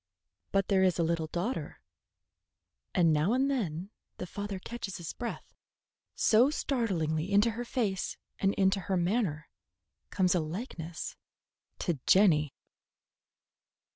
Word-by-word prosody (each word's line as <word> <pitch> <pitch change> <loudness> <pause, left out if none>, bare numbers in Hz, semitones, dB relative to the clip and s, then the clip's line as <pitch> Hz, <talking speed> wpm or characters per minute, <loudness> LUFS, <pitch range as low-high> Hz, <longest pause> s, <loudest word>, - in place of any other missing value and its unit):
But 195 -1 +2
there 195 -2 +3
is 185 -3 +3
a 170 - +2
little 165 -1 0
daughter, 180 +11 -3 1.2
and 170 -4 +4
now 155 +8 +2
and 270 +2 +2
then 190 - -2 0.3
the - - -4
father 200 +2 -5
catches 200 0 -6
his 170 -3 -6
breath, 240 -1 -6 0.6
so 235 +5 +5
startlingly 190 - -1
into 205 +3 +4
her 235 +2 -4
face 215 -6 -2 0.2
and 195 0 +2
into 195 0 +3
her 190 0 -1
manner 175 - 0 0.6
comes 185 -2 +2
a 180 - +2
likeness 165 - -5 0.6
to 170 -6 -1
Jenny. 155 -7 +5
190 Hz, 125 wpm, -30 LUFS, 165-215 Hz, 1.2 s, so